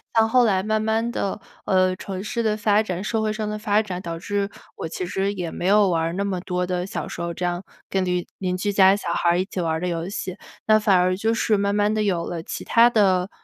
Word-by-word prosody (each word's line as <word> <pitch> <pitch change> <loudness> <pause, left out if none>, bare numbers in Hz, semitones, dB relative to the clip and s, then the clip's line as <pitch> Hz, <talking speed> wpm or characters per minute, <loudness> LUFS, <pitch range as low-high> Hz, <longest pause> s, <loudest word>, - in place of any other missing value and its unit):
像 225 -1 +5
后 250 0 +5
来 190 -4 +2
慢 215 +1 0
慢 225 +2 0
地， 200 -3 -2 0.3
呃， 185 -1 +3
城 190 0 -6
市 235 +2 -2
的 215 -1 +1
发 210 0 +3
展、 185 -3 -4
社 220 +1 -1
会 215 0 0
上 215 -1 -3
的 215 - -4
发 210 0 +2
展， 185 -4 -5
导 170 -2 -5
致 200 +2 -2 0.3
我 - - -4
其 180 +2 -4
实 195 +3 -1
也 175 -4 -4
没 - - -5
有 205 -1 +5
玩 165 -2 +1
儿 165 +1 -1
那 195 +3 -1
么 195 -2 -2
多 180 -1 -2
的 180 0 -2
小 - - -4
时 - - -6
候 170 0 -3
这 180 - -6
样 175 +1 -1 0.3
跟 190 -1 0
邻 180 -1 -1
邻 185 -1 -2
居 205 +3 -1
家 195 -1 +6
小 170 -4 -3
孩 170 - +1
儿 175 - +2
一 185 - 0
起 190 - -6
玩 165 -2 0
儿 160 - -2
的 180 - -1
游 170 0 -2
戏， 190 -1 -5 0.3
那 215 0 +6
反 200 -3 +4
而 185 +1 +2
就 220 +2 +1
是 225 -1 +2
慢 200 0 0
慢 210 +1 +2
地 215 - 0
有 180 -5 0
了 170 -2 -4
其 - - -6
它 235 +1 +5
的 195 -4 +2
195 Hz, 290 characters per minute, -23 LUFS, 180-215 Hz, 0.3 s, 家